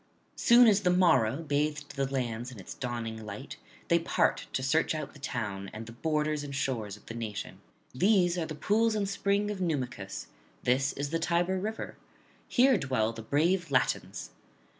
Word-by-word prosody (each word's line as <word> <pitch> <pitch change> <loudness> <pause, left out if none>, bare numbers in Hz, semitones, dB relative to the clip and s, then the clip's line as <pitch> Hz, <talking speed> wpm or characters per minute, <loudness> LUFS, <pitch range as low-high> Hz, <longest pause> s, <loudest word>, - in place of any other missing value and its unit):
Soon 240 0 +7
as 205 -2 +5
the 180 - +2
morrow 165 -7 +3
bathed 150 -1 -1
the 135 -1 -1
lands 120 -2 -2
in 120 - -10
its 95 - -8
dawning 115 -3 -4
light, 105 -1 -7 0.3
they - - +4
part - - +1
to 130 - -2
search 155 +4 +2
out 155 -2 -5
the - - -14
town, 105 -8 -4
and 110 +1 -6
the 115 - -9
borders 150 +3 -1
and 140 -1 -6
shores 110 -7 -2
of - - -21
the - - -7
nation: 110 -3 -5 0.3
these 180 - +3
are 170 -3 -2
the 155 - -5
pools 215 +8 +2
and 205 -2 0
spring 200 +1 0
of 195 -2 -5
Numicus; 125 - -3 0.4
this 130 +3 +2
is 140 +1 -4
the 165 - 0
Tiber 175 +3 +1
river; 215 +3 -4 0.5
here 255 -3 +4
dwell 130 -6 0
the 115 - -7
brave 165 - +1
Latins. 125 - 0
145 Hz, 180 wpm, -30 LUFS, 120-180 Hz, 0.5 s, Soon